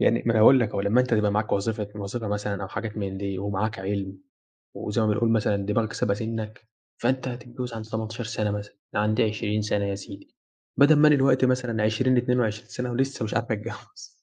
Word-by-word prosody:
يعني 115 Hz, -, +3 dB
ما 115 Hz, -, +4 dB
أنا 110 Hz, -, +3 dB
هاقول 130 Hz, +4 st, +8 dB
لك 115 Hz, -, +1 dB
أهو، 100 Hz, -, -2 dB
لمّا 105 Hz, +5 st, +3 dB
أنت 125 Hz, -2 st, +1 dB
تبقى 105 Hz, -1 st, +2 dB
معاك 105 Hz, +1 st, 0 dB
وظيفة 105 Hz, 0 st, -1 dB
وظيفة 105 Hz, +2 st, -4 dB
مثلًا 105 Hz, -1 st, -2 dB
أو 95 Hz, -, -5 dB
حاجات 110 Hz, +2 st, -5 dB
من 95 Hz, -2 st, -3 dB
دي 100 Hz, -1 st, -3 dB
ومعاك 100 Hz, +2 st, -2 dB
عِلم، 95 Hz, 0 st, -3 dB, 0.6 s
وزي 105 Hz, +2 st, -2 dB
ما 110 Hz, -, +2 dB
بنقول 105 Hz, +2 st, +2 dB
مثلًا 105 Hz, -2 st, +1 dB
دماغك 110 Hz, +2 st, 0 dB
سابقة 100 Hz, -, +1 dB
سِنك، 110 Hz, 0 st, -5 dB, 0.3 s
فأنت 130 Hz, +2 st, 0 dB
هتتجوّز 120 Hz, 0 st, -6 dB
عند 110 Hz, -1 st, -6 dB
18 110 Hz, +1 st, -4 dB
سَنة 105 Hz, -2 st, -2 dB
مثلًا، 105 Hz, 0 st, -6 dB, 0.2 s
عند 105 Hz, +1 st, +2 dB
20 105 Hz, -1 st, 0 dB
سَنة 105 Hz, -1 st, 0 dB
يا 100 Hz, 0 st, -2 dB
سيدي، 100 Hz, 0 st, -11 dB, 0.4 s
بدل 145 Hz, +3 st, +7 dB
ما 150 Hz, +1 st, +6 dB
أنا 150 Hz, -, +6 dB
الوقتي 130 Hz, -1 st, +4 dB
مثلًا 125 Hz, -4 st, 0 dB
20 125 Hz, +4 st, +2 dB
22 120 Hz, -3 st, 0 dB
سَنة 125 Hz, -1 st, -4 dB
ولسه 135 Hz, 0 st, -1 dB
مش 105 Hz, -, -3 dB
عارف 115 Hz, 0 st, -1 dB
اتجوّز. 110 Hz, +1 st, -6 dB
110 Hz, 205 wpm, -25 LUFS, 105-120 Hz, 0.6 s, هاقول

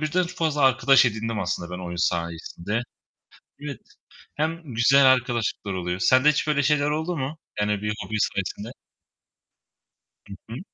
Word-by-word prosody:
birden 175 Hz, +4 st, 0 dB
ç 180 Hz, -, -9 dB
fazla 155 Hz, -4 st, -1 dB
arkadaş 135 Hz, 0 st, +5 dB
edindim 110 Hz, -1 st, -2 dB
aslında 85 Hz, -1 st, -3 dB
ben 90 Hz, -, -6 dB
oyun 85 Hz, 0 st, -6 dB
sayesinde. 85 Hz, +5 st, -4 dB, 0.8 s
Evet. 140 Hz, -5 st, -6 dB, 0.6 s
Hem 160 Hz, -3 st, -3 dB
güzel 135 Hz, +4 st, +5 dB
arkadaşlıklar 120 Hz, -5 st, +1 dB
oluyor. 90 Hz, 0 st, -3 dB
Sende 130 Hz, +8 st, +5 dB
hiç 150 Hz, 0 st, 0 dB
böyle 145 Hz, -2 st, +2 dB
şeyler 150 Hz, 0 st, +2 dB
oldu 160 Hz, +3 st, -2 dB
mu? 140 Hz, +4 st, -4 dB, 0.2 s
Yani 105 Hz, -1 st, 0 dB
bir 105 Hz, 0 st, -1 dB
hobin 110 Hz, +2 st, -3 dB, 0.2 s
sayesinde. 100 Hz, +4 st, -4 dB, 1.6 s
Hı 100 Hz, -, -9 dB, 0.2 s
hı. 120 Hz, +5 st, -6 dB
125 Hz, 145 wpm, -24 LUFS, 100-150 Hz, 1.6 s, arkadaş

